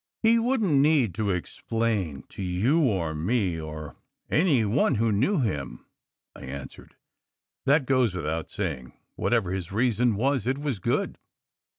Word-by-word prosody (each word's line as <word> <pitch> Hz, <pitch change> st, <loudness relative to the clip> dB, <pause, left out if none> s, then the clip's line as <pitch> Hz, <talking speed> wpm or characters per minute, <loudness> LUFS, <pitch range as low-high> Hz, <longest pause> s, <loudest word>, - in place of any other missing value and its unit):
"He 230 Hz, +1 st, +5 dB
wouldn 230 Hz, -4 st, +1 dB
t 150 Hz, -, +3 dB
need 140 Hz, -, +3 dB
to 105 Hz, +3 st, -1 dB
explain 95 Hz, -3 st, -2 dB
to -, -, -8 dB
you, 95 Hz, -, +1 dB
or 95 Hz, -, +1 dB
me, 90 Hz, +1 st, 0 dB
or 75 Hz, -1 st, -8 dB, 0.3 s
any 150 Hz, -, +3 dB
one 110 Hz, +5 st, +2 dB
who 115 Hz, +1 st, +1 dB
knew 135 Hz, -, +2 dB
him," 70 Hz, -, -3 dB, 0.5 s
I -, -, -12 dB
answered. 65 Hz, +1 st, -9 dB, 0.7 s
"That 140 Hz, 0 st, +4 dB
goes 125 Hz, -7 st, +2 dB
without 80 Hz, -1 st, -3 dB
saying. 75 Hz, -11 st, -4 dB, 0.2 s
Whatever 115 Hz, -7 st, +1 dB
his 95 Hz, -2 st, -4 dB
reason 120 Hz, +1 st, +2 dB
was, 130 Hz, +1 st, 0 dB
it 130 Hz, +1 st, +1 dB
was 140 Hz, -7 st, -3 dB
good. -, -, -1 dB
110 Hz, 150 wpm, -26 LUFS, 85-135 Hz, 0.7 s, He